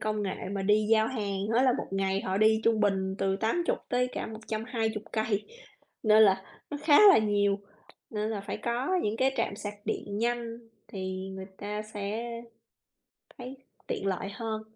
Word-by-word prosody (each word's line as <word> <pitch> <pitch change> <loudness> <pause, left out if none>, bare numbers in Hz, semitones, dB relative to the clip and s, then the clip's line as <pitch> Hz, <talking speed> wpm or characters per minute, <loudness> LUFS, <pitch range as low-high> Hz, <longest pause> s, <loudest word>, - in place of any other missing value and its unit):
công 215 -1 -1
nghệ 195 -2 -2 0.2
mà 200 -1 -2
đi 210 +2 +3
giao 220 -1 +5
hàng 200 -5 -2
á, 245 - +5
là 260 -1 +5
một - - -3
ngày 195 0 0
họ 190 -1 -2
đi 220 +1 +4
trung 225 -2 +3
bình 190 -2 +1
từ 195 0 +1
80 230 - 0
tới 250 0 +1
cả - - -3
120 220 0 -3
cây, 215 -2 0 0.6
nên 215 -1 +6
là, 190 -2 +4 0.3
nó 295 - -3
khá 300 -1 +6
là 390 - +8
nhiều, 205 -2 +2 0.5
nên 215 0 -2
là 210 -2 -2
phải 200 - -5
có 245 +10 0
những 210 +1 -1
cái 265 +3 +2
trạm 215 -4 -1
sạc 205 -1 -5
điện 205 0 -3
nhanh 235 0 -1 0.3
thì 190 0 -5
người 190 0 -7
ta 210 +1 -4
sẽ 215 +1 -4 1.2
thấy 255 +2 -7 0.3
tiện 195 - -3
lợi 195 0 -1
hơn. 220 -1 -4
215 Hz, 180 wpm, -29 LUFS, 200-230 Hz, 1.2 s, là